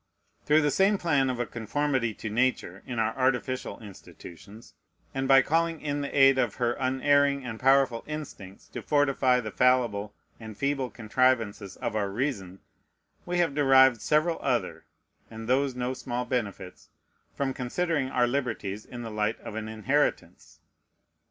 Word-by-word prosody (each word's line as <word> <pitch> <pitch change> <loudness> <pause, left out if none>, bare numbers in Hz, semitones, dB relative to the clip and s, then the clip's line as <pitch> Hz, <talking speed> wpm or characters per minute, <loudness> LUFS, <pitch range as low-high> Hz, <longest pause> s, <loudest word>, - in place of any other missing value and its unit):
Through 150 +1 +5
the 145 - +2
same 195 +6 +3
plan 145 -7 +1
of 125 -1 -3
a 120 - 0
conformity 120 0 -2
to 110 - -6
Nature 115 -5 -1
in 125 - -5
our 110 0 0
artificial 130 0 -1
institutions, 100 +1 -13 0.4
and 135 0 -2
by 135 0 +6
calling 165 0 0
in 145 -1 -3
the 140 - -3
aid 135 -1 +5
of - - 0
her 120 -1 0
unerring 140 +1 +2
and 115 -2 -6
powerful 135 -2 +3
instincts 145 -11 -8
to - - -7
fortify 135 -3 +2
the 110 -2 -6
fallible 115 -4 +1 0.2
and 110 -3 -10
feeble 140 -2 -1
contrivances 110 -4 0
of - - -4
our 100 -2 0
reason, 100 -5 -4 0.7
we 175 0 -1
have 170 -4 +1
derived 130 -4 +5
several 155 +2 +1
other, 125 -4 -2 0.4
and 110 0 -9
those 130 +1 +1
no 125 +1 -2
small 125 -1 -4
benefits, 105 -7 -5 0.5
from 135 -1 -1
considering 135 +2 -2
our 125 -2 +2
liberties 115 -6 -3
in 120 -1 -8
the 115 - -6
light 105 +1 -1
of - - -8
an 110 0 -5
inheritance. 130 +7 -2
130 Hz, 155 wpm, -27 LUFS, 110-140 Hz, 0.7 s, by